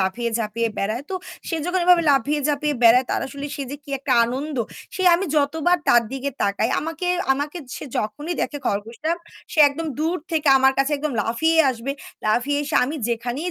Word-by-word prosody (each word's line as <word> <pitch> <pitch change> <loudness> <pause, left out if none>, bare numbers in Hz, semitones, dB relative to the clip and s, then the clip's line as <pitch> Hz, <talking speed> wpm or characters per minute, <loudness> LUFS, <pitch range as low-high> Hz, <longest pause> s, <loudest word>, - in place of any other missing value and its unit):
লাফিয়ে 230 +5 -1
ঝাঁপিয়ে 230 +1 -1
বেড়ায়। 215 +6 -1
তো - - -2 0.3
সে 330 - -1
যখন 360 +1 0
এভাবে 355 -1 +6
লাফিয়ে 285 +2 +2
ঝাঁপিয়ে 295 0 0
বেড়ায় 245 +3 +6
তার - - 0
আসলে 280 +1 -6
সে 280 - -4
যে 285 - -5
কি 285 - -11
একটা 270 - -1
আনন্দ! 270 +4 -4 0.4
সে 375 - -2
আমি 375 +3 0
যতবার 320 +4 +2
তার 240 -1 +6
দিকে 270 +1 -3
তাকাই 200 +3 +1
আমাকে, 325 +3 -4 0.3
আমাকে, 290 +5 -3 0.2
সে - - -7
যখনই 295 +11 -3
দেখে 290 - -3
খরগোশটা 230 +10 -2 0.4
সে - - -5
একদম 320 +4 -5
দূর 325 +3 0 0.2
থেকে 310 -2 +1
আমার 265 0 +4
কাছে 275 +2 +2
একদম 295 -1 -3
লাফিয়ে 320 +10 +1
আসবে। 255 +3 -4 0.3
লাফিয়ে 250 +7 +1
এসে 290 - -4
আমি 285 - -4
যেখানেই 240 +8 -2
280 Hz, 185 wpm, -22 LUFS, 235-310 Hz, 0.4 s, এভাবে